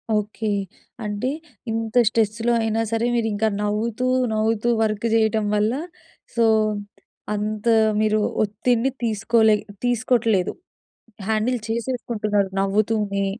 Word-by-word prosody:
Okay. 215 +1 -2 0.6
అంటే 210 +4 -2 0.4
ఇంత 225 0 -3
స్ట్రెస్‌లో 225 +1 +1
అయినా 225 0 0
సరే, 225 +1 +1
మీరింకా 220 -2 +1 0.2
నవ్వుతూ, 220 +4 -1 0.3
నవ్వుతూ 220 +1 +1
వర్క్ 215 +1 0
చేయటం 220 -1 +2
వల్ల 210 +2 +2 0.6
సో, 235 -1 +3 0.9
అంత 210 +1 -3 0.3
మీరు 215 0 +2 0.2
ఒత్తిడిని 230 +5 0
తీసుకో‌లే 220 0 +3 0.3
తీసుకోట్లేదు. 230 -5 +1 0.8
హ్యాండిల్ 220 +3 +1
చేసేసుకుంటున్నారు 225 -4 -1
నవ్వుతూనే. 200 0 +1
220 Hz, 95 wpm, -22 LUFS, 210-230 Hz, 0.9 s, సో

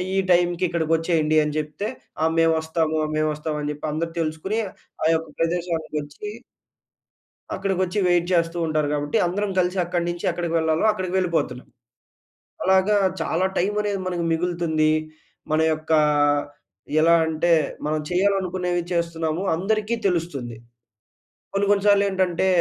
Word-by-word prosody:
ఈ - - +1
టైంకి 175 0 +2
ఇక్కడికి 165 -2 -1
వచ్చేయండి. 160 -2 +1
అని 150 0 -3
చెప్తే 150 +7 -4 0.4
ఆ! - - +4
మేము 165 0 +4
వస్తాము 160 -1 0 0.2
మేము 155 0 +1
వస్తాము 150 0 -4
అని 145 - -1
చెప్పి 150 +1 -6
అందరూ 165 +1 -3
తెలుసుకొని 160 +8 -2 0.4
ఆ! - - +4
యొక్క 160 -1 -3
ప్రదేశానికి 165 -1 -1
వచ్చి... 150 +8 -8 1.3
అక్కడికి 195 -2 -1
వచ్చి 185 +3 -1
వైట్ 175 -1 +2
చేస్తూ 170 0 +1
ఉంటారు 155 -1 0
కాబట్టి 145 0 0
అందరం 200 +3 -1
కలిసి 180 +1 +1
అక్కడి 175 -1 -1
నుంచి 175 0 -5
ఎక్కడికి 170 -1 -3
వెళ్ళాలో 160 +4 +1
అక్కడికి 185 -3 -4
వెళ్ళిపోతున్నాం. 170 -8 -1 1.0
అలాగా 190 +2 +4 0.2
చాలా 165 +3 0
టైమ్ 200 +4 0
అనేది 205 -2 -1
మనకు 175 -2 -2
మిగులుతుంది. 165 -2 +1 0.6
మన 155 - +2
యొక్క 155 +1 -3 1.1
ఎలా 165 +2 +5
అంటే 160 +2 +1 0.3
మనం 155 0 0
చేయాలనుకునేవి 180 -2 0
చేస్తున్నాము 170 0 -1
అందరికి 215 +4 0
తెలుస్తుంది. 145 - -2 1.0
కొన్ని 200 +1 +1
కొన్ని 200 -1 +3
సార్లు 200 0 +5
ఏంటంటే 185 -1 0
170 Hz, 140 wpm, -23 LUFS, 160-185 Hz, 1.3 s, ఎలా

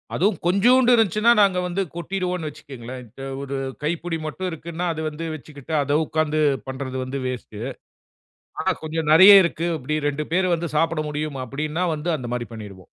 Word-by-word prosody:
அதுவும் 190 0 +2
கொஞ்சூண்டு 240 +7 +5
இருந்துச்சுன்னா, 220 +1 +3
நாங்க 190 -3 +3
வந்து 185 +3 -1
கொட்டிடுவோண்ணு 180 -2 -3
வச்சுகங்களேன். 130 -3 -9
இத்த 135 - -14 0.2
1 140 0 -4 0.3
கைப்புடி 165 +1 -2
மட்டும் 180 +4 -3
இருக்குன்னா, 170 +2 -5
அத 160 - -5
வந்து 155 +2 -6
வச்சிக்கிட்டு, 150 +1 -9
அத 145 +2 +1
உக்காந்து 155 0 0 0.3
பண்றது 130 0 -5
வந்து 135 +2 -4
வேஸ்ட்டு. 115 -4 -6 1.0
ஆனா - - +2
கொஞ்சம் 155 -1 -2
நெறைய 190 +5 +10
இருக்கு. 170 0 -1
அப்பிடி 150 +4 -2
2 150 +1 -3
பேரு 185 0 +2
வந்து 170 0 -3
சாப்பிட 165 0 +1
முடியும் 150 -1 -3
அப்பிடின்னா, 155 +7 -2
வந்து 165 +4 -3
அந்தமாரி 120 -3 -4
பண்ணிருவோம். 100 -4 -10
155 Hz, 155 wpm, -23 LUFS, 140-175 Hz, 1.0 s, நெறைய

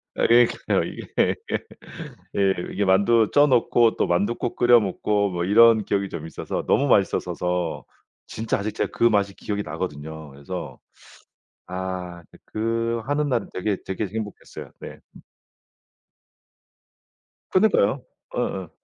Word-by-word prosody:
아 - - +2
그러니까요. 120 0 +3
이게 - - -1 1.4
이게 100 +1 0
만두 100 +4 +4
쪄 145 +1 +6
놓고 120 -3 +3
또 - - +1
만둣국 105 +7 -1
끓여 120 -1 +6
먹고 100 +1 0
뭐 85 -1 -2
이런 110 +1 +6
기억이 100 -1 -1
좀 80 -2 -7
있어서 - - -5
너무 - - +2
맛있었어서 90 -2 0 0.4
진짜 110 0 -2
아직 105 +1 -3
제가 - - -2
그 - - -1
맛이 100 -3 +3
기억이 105 -1 -4
나거든요. 80 -2 -6
그래서 70 0 -7 0.9
아 90 -1 -5 0.2
그 110 - -6
그 115 +1 -1
하는 145 +1 0
날은 120 -3 -1
되게, 95 +2 -1
되게 95 +2 -3
행복했어요. 105 +1 -7
네. - - -9 2.5
그니까요. 185 - +3 0.3
어어. 95 -4 -3
100 Hz, 260 characters per minute, -23 LUFS, 90-115 Hz, 2.5 s, 쪄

